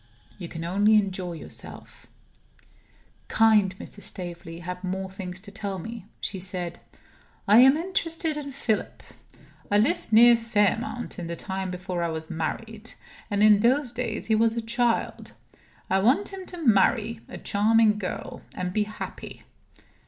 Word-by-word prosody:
You 175 - -6
can 165 0 -7
only 205 +5 +3
enjoy 190 -4 0
yourself. 160 - -10 1.2
Kind 210 -4 +4
Mrs. 205 - -9
Staveley 175 -2 -8
had 180 +1 -6
more 190 +1 -3
things 190 -1 -7
to 200 0 -10
tell 200 -1 -4
me. 225 +2 -8
She 195 - -3
said: 180 -2 -4 0.7
"I 210 +3 +7
am 265 +3 +7
interested 330 -3 -1
in 285 -2 -5
Philip. 245 -5 -2 0.7
I 205 - +3
lived 215 +1 +1
near 235 +2 +8
Fairmount 230 +1 -1
in 170 - -5
the 170 - -4
time 190 +2 -4
before 180 -1 -4
I 170 - 0
was 160 0 -4
married; 215 +7 -5 0.4
and 205 -1 +1
in 210 -1 +7
those 250 +3 +2
days 240 -2 -3
he 220 - +1
was 225 +1 +2
a - - 0
child. 235 0 -1 0.5
I 190 - +2
want 255 - +3
him 385 -1 -8
to 355 - -8
marry 225 +1 +3
a - - -7
charming 215 +1 +3
girl, 185 - -5
and 180 0 -3
be 210 0 +1
happy." 215 +1 -8
210 Hz, 150 wpm, -26 LUFS, 185-230 Hz, 1.2 s, near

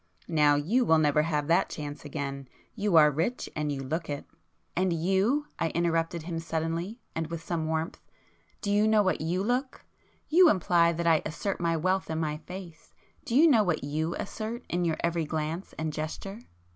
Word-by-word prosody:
Now 150 -3 +4
you 195 - +2
will 160 -8 +4
never 150 -1 +3
have 150 -2 -1
that 170 +4 +2
chance 145 -1 -6
again;—you 145 - -4
are 150 -2 +7
rich 165 - -1
and 150 -1 -1
you 135 -1 -3
look 160 +5 -3
it!" 145 -1 -4 0.5
"And 185 +1 +1
you,—" 195 - +1
I 165 - +1
interrupted 165 -1 0
him 165 0 -4
suddenly, 165 +6 -3
and 165 -1 -2
with 165 0 -6
some 165 -2 -2
warmth—"do 160 +5 -6
you 210 +1 +4
know 215 -1 +4
what 185 - 0
you 175 +4 -1
look? 250 +4 -2 0.4
You 350 +2 +6
imply 170 - +3
that 170 +1 -3
I 165 -2 +4
assert 175 +5 -3
my 165 -1 +1
wealth 185 +4 0
in 160 0 -2
my 150 -2 -1
face; 175 0 -11 0.3
do 240 -5 -2
you 315 +5 +7
know 250 -8 +5
what 175 -8 0
you 155 +4 -2
assert 225 +4 -5
in 175 0 0
your 160 -2 0
every 170 -1 0
glance 160 +4 -4
and 155 -1 -2
gesture?" 175 +7 -5
165 Hz, 185 wpm, -28 LUFS, 155-190 Hz, 0.5 s, are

